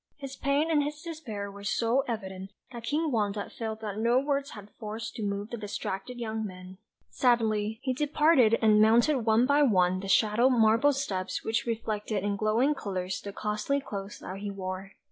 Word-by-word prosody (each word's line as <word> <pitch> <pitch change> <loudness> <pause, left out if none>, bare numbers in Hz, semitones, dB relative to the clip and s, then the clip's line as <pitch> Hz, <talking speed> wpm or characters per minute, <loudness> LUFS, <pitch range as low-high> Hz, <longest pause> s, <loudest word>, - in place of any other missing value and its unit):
His 275 -1 -7
pain 285 +4 +1
and 300 -2 +4
his 295 +1 -4
despair 240 -12 -6
were 200 0 -11
so 230 +5 +1
evident, 190 -4 -5 0.2
that 235 -2 -8
King 305 +4 0
Wanda 205 -3 -1
felt 220 -1 -5
that 210 -1 -4
no 235 +2 +3
words 280 +1 0
had 210 -1 -11
force 220 0 -5
to 230 - -8
move 200 0 -3
the 235 - -4
distracted 205 +2 -5
young 220 -2 -3
man. 185 -2 -9 0.3
Sadly 220 -3 +1
he 260 - 0
departed, 285 -4 +4
and 215 -1 +6
mounted 235 +6 +4
one 225 +2 +5
by 285 +2 +3
one 185 -8 +3
the 195 - -6
shallow 220 +5 +4
marble 230 +3 +4
steps 190 -9 -3
which 225 +2 -1
reflected 215 -3 -2
in 205 0 0
glowing 220 +8 +2
colours 185 -7 -4
the 200 - -6
costly 210 +7 -1
clothes 200 -6 -6
that 190 +1 -7
he 205 0 -4
wore. 195 0 -6
220 Hz, 185 wpm, -28 LUFS, 200-255 Hz, 0.3 s, and